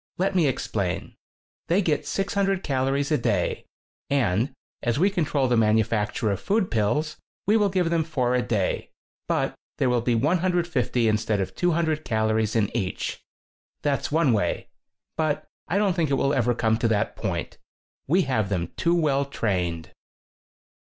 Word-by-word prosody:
Let 190 +2 +1
me 175 -5 +3
explain. 100 -8 -2 0.5
They 190 +4 +2
get 155 -4 0
600 195 -1 0
calories 135 +1 0
a 150 - +3
day, 105 -7 -1 0.4
and 120 -3 +1 0.3
as 120 -1 0
we 190 +6 +3
control 150 -7 +1
the 125 - +2
manufacture 110 -1 +2
of 100 - -2
food 205 -1 0
pills, 150 +8 0 0.3
we 210 - +3
will 210 -2 +3
give 180 -3 +1
them 165 -1 +2
four 130 -6 0
a 125 - +2
day, 110 -6 -1 0.4
but - - 0 0.2
there 125 - +2
will 120 -1 +2
be 120 0 +1
150 165 - +1
instead 110 -1 +1
of 95 - -2
200 160 -3 0
calories 110 0 0
in 110 -3 +1
each. 95 -2 -3 0.6
That's 145 -1 0
one 155 -5 +3
way. 100 -5 -1 0.5
But 155 -2 0 0.2
I 185 - 0
don't 200 -2 +2
think 165 -5 +1
it 140 - +2
will 140 +1 +1
ever 120 -3 +2
come 110 -2 +1
to 115 - +2
that 110 -1 0
point. - - -4 0.5
We 180 +7 +3
have 110 -8 0
them 90 -3 -2
too 170 +1 +2
well 140 -4 +2
trained." 90 -11 -2
135 Hz, 160 wpm, -25 LUFS, 110-165 Hz, 0.6 s, me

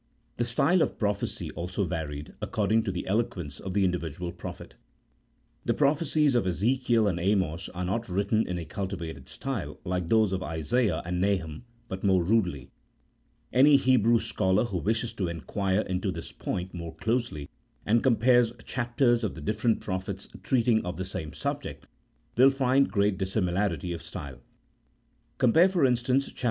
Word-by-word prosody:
The 120 - +1
style 140 +10 +3
of - - +3
the - - -19
prophecy 100 -2 -2
also 90 +4 -3
varied 75 -4 -5
according 110 +2 +1
to 95 - -1
the 90 - -4
eloquence 95 -7 -2
of 95 0 -6
the 100 -2 +3
individual 90 -1 -2
prophet. 85 -2 -9 0.9
The - - 0
prophecies 150 0 +2
of 120 -6 +2
Ezekiel 115 +4 +2
and 90 -4 0
Amos 95 -3 0
are 90 0 -4
not 110 +4 -2
written 100 +4 +1
in 90 - -2
a 85 - -5
cultivated 85 -6 -5
style 95 - -4
like 90 -2 -2
those 110 -3 +3
of 95 - -1
Isaiah 85 - 0
and 90 +1 -2
Nahum, 95 0 -1 0.2
but 95 -2 -6
more 95 -3 +3
rudely. 90 - 0 0.8
Any 140 +3 +7
Hebrew 120 -3 +4
scholar 105 -2 +1
who 95 -6 -3
wishes 115 +4 -1
to 95 -5 -2
inquire 95 +5 -1
into 95 -3 -2
this - - -7
point 90 +1 -4
more 85 -2 -7
closely, 115 - -2 0.4
and 115 +2 +3
compares 120 -1 +4
chapters 120 -1 +1
of 105 - -2
the - - -8
different 110 +2 0
prophets 95 0 -4
treating 120 -3 +2
of 90 0 -4
the 95 - -3
same 80 -5 -5
subject, 75 - -4 0.5
will 130 +3 +7
find 135 0 +2
great 100 -2 +1
dissimilarity 95 -3 -1
of 85 - -6
style. 70 -3 -8 1.0
Compare, 160 +10 +5
for 175 -7 +2
instance, 125 +2 +2
chap. - - -13
100 Hz, 160 wpm, -28 LUFS, 90-120 Hz, 1.0 s, Any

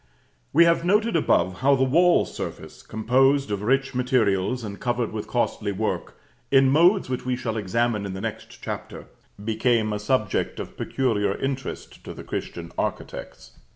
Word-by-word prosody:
We 170 +3 +6
have 170 0 +3
noted 210 +5 +2
above 95 - +2
how 140 +2 +4
the 130 - +2
wall 170 +7 +4
surface, - - -7
composed 130 +3 +2
of 100 -1 -2
rich 135 +5 +1
materials, 125 -3 +1
and 100 -2 -6
covered 120 -1 -1
with 105 -1 -5
costly 110 -4 -1
work, 105 +3 -3 0.3
in 135 -1 +5
modes 175 +7 +4
which 130 -1 -3
we 125 0 -1
shall 115 -2 -3
examine 110 0 0
in 95 - -5
the - - -5
next - - -7
Chapter, - - -6 0.4
became 110 -1 +1
a 105 - -2
subject 105 -1 0
of - - -7
peculiar 115 -6 0
interest 135 -1 -5
to - - -8
the - - -9
Christian - - -6
architects. 60 0 -5
125 Hz, 160 wpm, -24 LUFS, 105-135 Hz, 0.4 s, We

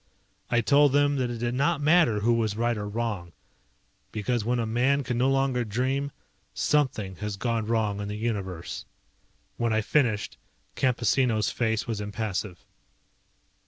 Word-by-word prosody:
I 120 0 +3
told 140 +3 +4
them 145 0 +3
that 125 -2 0
it 120 - -4
did 120 +1 -2
not 140 +5 +1
matter 150 -8 +4
who 120 +3 +3
was 110 -3 0
right 120 +1 +1
or 105 -1 -4
wrong, 105 -6 -3 0.8
because 110 +2 -1
when 120 +3 0
a 115 - 0
man 130 +5 +2
can 125 - -2
no 125 +3 +2
longer 135 -2 +1
dream 130 +6 -1 0.4
something 115 - 0
has 105 -2 -4
gone 115 0 -1
wrong 110 -3 0
in 100 - -4
the 105 +1 -4
Universe. 95 -7 -4 0.7
When 120 -1 0
I 110 0 +2
finished, 110 -3 0 0.4
Campesino's 120 -3 +2
face 110 -2 0
was 110 -3 -3
impassive. 105 -3 -4
115 Hz, 155 wpm, -27 LUFS, 105-130 Hz, 0.8 s, told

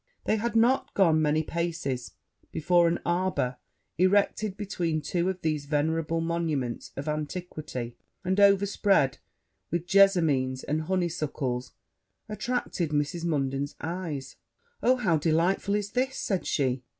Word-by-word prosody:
They 215 - +1
had 235 +2 -2
not 260 +5 +3
gone 165 -5 +4
many 155 +1 +2
paces, 160 -7 -3 0.4
before 175 +2 +3
an 170 +1 0
arbour, 175 -8 0 0.4
erected 200 +2 +2
between 175 -6 -1
two 175 +4 -1
of 185 -1 -4
these 155 -2 -1
venerable 160 +2 0
monuments 160 -7 -2
of 140 +3 -5
antiquity, 150 -6 -4 0.3
and 190 +2 +1
overspread 200 -7 +4 0.5
with 170 +1 -2
jessamines 165 -10 +3
and 155 +2 -1
honeysuckles, 155 -8 -2 0.5
attracted 210 -5 -2
Mrs. 150 +3 -1
Munden's 140 -3 -1
eyes. 160 -5 -5 0.4
'Oh, 255 +2 +4
how 190 -10 +2
delightful 170 +6 +1
is 205 -1 -2
this!' 260 +1 0
said 190 -4 -1
she. 130 -3 0
170 Hz, 125 wpm, -28 LUFS, 150-190 Hz, 0.5 s, gone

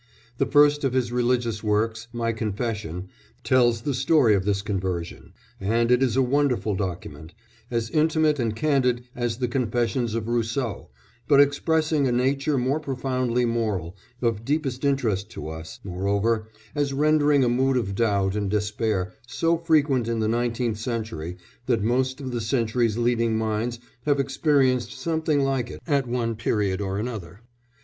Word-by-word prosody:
The - - +2
first 145 0 +4
of 135 -2 +1
his 125 -2 0
religious 120 -2 0
works, 110 +2 0
My 115 -1 -1
Confession, 105 -5 -3 0.3
tells 120 -3 +3
the 140 +4 -1
story 130 -2 +4
of 95 -2 +1
this 100 -1 0
conversion, 95 -4 -4 0.3
and 115 +4 +1
it 125 +1 +4
is 125 -4 +2
a 135 - +4
wonderful 130 -4 +1
document 85 -3 -5 0.3
as 115 -2 -2
intimate 155 -1 +2
and 115 -3 -1
candid 125 -2 +1
as 120 -2 -2
the 125 -1 -1
confessions 120 -1 -1
of 115 -1 -2
Rousseau, 120 0 -2 0.4
but 140 -2 +5
expressing 150 +1 +2
a - - +1
nature 135 +4 +1
more 130 +4 +1
profoundly 130 -3 -1
moral, 105 -7 -1 0.3
of 115 -2 0
deepest 140 -1 -1
interest 115 -8 0
to - - -6
us, 80 0 -8
moreover, 100 +4 0 0.3
as 145 -2 -1
rendering 150 -1 +3
a - - +3
mood 130 +2 +2
of 100 -5 -1
doubt 100 -3 +1
and 100 -2 -1
despair 105 -2 -1
so 165 +9 +1
frequent 150 -7 +2
in 115 0 -1
the 110 - +1
nineteenth 115 -1 -1
century 110 -8 -4 0.3
that 115 -5 +1
most 130 +4 0
of 130 -2 -5
the 120 -1 -2
century's 115 -1 0
leading 115 -1 +1
minds 110 +2 -1 0.3
have 145 -1 +3
experienced 135 -3 +2
something 160 +1 0
like 135 -3 0
it - - -8
at 140 -5 +1
one 120 -1 -1
period 105 -3 -1
or 95 -1 -2
another. 105 -4 -5
120 Hz, 155 wpm, -25 LUFS, 110-135 Hz, 0.4 s, but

